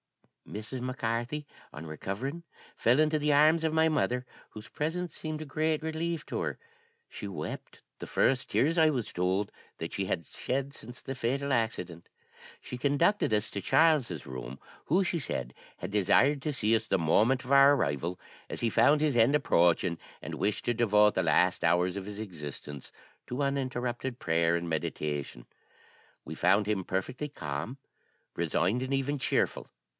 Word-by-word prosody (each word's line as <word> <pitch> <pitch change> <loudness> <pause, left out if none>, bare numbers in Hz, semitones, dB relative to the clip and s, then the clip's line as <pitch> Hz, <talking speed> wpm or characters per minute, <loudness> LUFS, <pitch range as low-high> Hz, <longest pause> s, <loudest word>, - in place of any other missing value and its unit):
"Mrs. 110 +5 -5
Mac 130 +1 -4
Carthy, 120 +6 -2 0.3
on 75 +2 -8
recovering, 105 - -5 0.3
fell 120 +5 +3
into 155 0 +3
the 150 0 +2
arms 155 +3 +5
of 160 - +1
my 160 0 +4
mother, 125 -5 0 0.2
whose 110 0 -10
presence 165 +2 -3
seemed 155 -1 -5
a - - -5
great 155 +2 0
relief 160 0 -2
to - - -4
her. - - -3 0.5
She - - -8
wept 80 -6 -7 0.2
the - - -7
first 130 -1 +1
tears, 160 +5 +2
I 160 -1 +6
was 125 -7 -2
told, 95 +3 0 0.3
that 80 - -5
she 100 - -1
had 85 -3 -2
shed 135 - -3
since 120 -1 -11
the 135 - -5
fatal 135 +3 -1
accident. 90 -8 -2 0.5
She 125 - -7
conducted 145 - +2
us 105 +1 +1
to 100 - -4
Charles's 135 - +3
room, 65 0 -7 0.3
who, 180 +6 +3
she 175 -1 -1
said, 65 - -3 0.2
had - - -6
desired 135 +8 +3
to 150 - -1
see 115 -5 +2
us 110 0 -1
the 95 - +2
moment 110 +11 +2
of 130 - -6
our 140 +1 +7
arrival, 85 - -1 0.3
as - - -4
he 115 - +1
found 150 +7 +5
his 150 -3 +1
end 120 +5 +5
approaching, 85 - +2 0.2
and - - -6
wished 105 - -1
to 120 - +2
devote 105 -3 +4
the - - +1
last - - +3
hours 90 +1 +2
of 100 -1 -5
his 105 0 -7
existence 75 -7 -7 0.4
to 125 +3 -3
uninterrupted 130 -2 -2
prayer 85 0 +2
and 85 0 -4
meditation. 75 -5 -3 0.8
We - - -6
found 105 0 +3
him 105 -3 0
perfectly 125 +12 -3
calm, 75 - -5 0.6
resigned, 85 +7 +1
and 130 +1 -2
even 135 +2 0
cheerful. - - 0
120 Hz, 170 wpm, -30 LUFS, 90-145 Hz, 0.8 s, our